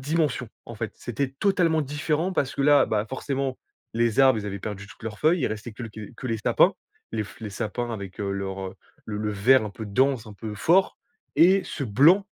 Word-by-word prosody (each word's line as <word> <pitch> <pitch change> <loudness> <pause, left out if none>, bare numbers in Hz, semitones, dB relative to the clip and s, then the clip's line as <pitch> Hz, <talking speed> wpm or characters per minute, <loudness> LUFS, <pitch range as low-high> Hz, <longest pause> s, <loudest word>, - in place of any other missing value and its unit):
dimension. 145 -4 0 0.2
En 115 - -9
fait, 110 0 -4
c'était 130 +3 -3
totalement 170 -5 +3
différent, 150 +5 -1
parce 140 -6 -1
que 140 - -3
là, 145 0 +6
bah, 105 -1 0
forcément, 135 0 -3 0.4
les 115 +2 +2
arbres, 130 -4 +6
ils 105 - -5
avaient 100 0 -4
perdu 100 0 -6
toutes 110 - -16
leurs 110 -2 -6
feuilles, 165 +2 +3
il - - +1
restait 110 +1 -5
quelque 110 -2 -8
que 130 - -7
les 115 -2 0
sapins. 105 - +3 0.4
Les 110 -1 0
fl 100 +4 -14
les - - -3
sapins 120 +4 -3
avec, 100 -1 -7
heu, 100 -1 -1
leur, 95 0 -4
heu, - - -11 0.3
le 105 -1 -4
le 105 0 -1
vert 110 +4 +4
un 105 - -4
peu 110 +2 -7
dense, 130 +2 +1
un 105 - -10
peu 105 0 -6
fort. 175 - +3 0.4
Et 185 +3 +6
ce 155 - -5
blanc 160 - +5
120 Hz, 220 wpm, -25 LUFS, 105-145 Hz, 0.4 s, là